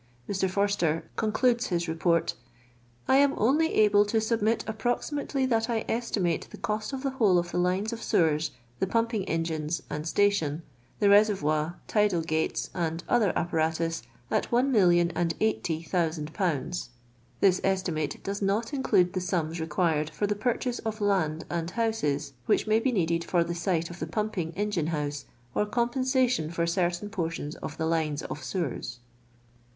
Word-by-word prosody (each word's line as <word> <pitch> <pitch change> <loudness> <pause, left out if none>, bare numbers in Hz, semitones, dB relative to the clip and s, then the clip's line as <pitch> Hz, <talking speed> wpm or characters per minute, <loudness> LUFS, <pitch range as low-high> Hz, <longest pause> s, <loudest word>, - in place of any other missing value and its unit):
Mr. 190 -1 0
Forster 190 -5 0
concludes 235 +2 +1
his 175 -2 -1
Report: 165 +1 +1 0.2
— 120 0 -31
" 120 0 -33
I 265 - +5
am 280 0 +4
only 295 +9 +2
able 205 -1 +5
to 220 +2 +2
submit 220 0 +1
approximately 250 +5 -1
that 230 -2 +1
I 225 -2 -1
estimate 205 -7 -1
the - - -10
cnst 215 +3 -2
of 270 -1 -5
the 275 - 0
whole 215 -8 +3
of 175 0 -1
the - - -1
lines 185 +5 0
of 230 - -6
sewers, 155 -2 +2 0.3
the - - +1
pumpincf 230 -1 0
en 165 0 +1
riiM's, 160 0 -3
and 150 +2 -3
station, 170 -5 +1 0.3
the 205 - +2
reservoir, 175 -6 +3
tidal 205 -6 +2
gatt.'8. 160 0 -1
and 165 -1 -2
oihi 240 -4 +3
r 180 - 0
apparatus, 165 0 0 0.3
at - - 0
one 250 +3 +3
million 175 -6 +4
and 170 0 -1
cijjhty 170 -7 -1
thousand 160 -3 -1
poundn 170 -9 0
(1,0S0,000/.) 175 - -4 0.5
This 190 -2 +4
esti 190 -2 +1
mate 155 -2 -3
does 200 +1 -3
not 210 +6 0
include 185 -9 +2
the 185 - -1
sums 170 -2 -1
required 160 -1 0
for 205 - -2
the 205 - +1
purchase 245 +3 -1
of 220 0 -4
land 180 -6 0
and 170 0 -3
houhes*. 165 -12 0 0.2
which - - +3
may 215 +1 +3
be 255 +3 +1
needed 170 -6 +1
for 175 -1 +2
tlie 170 0 -4
site 170 -2 -1
of 170 - -10
the 155 - -3
pumpin;; 190 -3 -2
engine 205 -6 -1
house, 150 -3 -3 0.3
or 210 - +1
coni 235 +3 0
pen.sition 255 - +1
for 170 0 0
cert^iiii 175 +3 -1
portions 165 -5 -3
of 150 - -7
the 160 - -1
lines 160 -2 0
of 145 - -6
sewers." 140 -7 -3
180 Hz, 175 wpm, -28 LUFS, 160-215 Hz, 0.5 s, I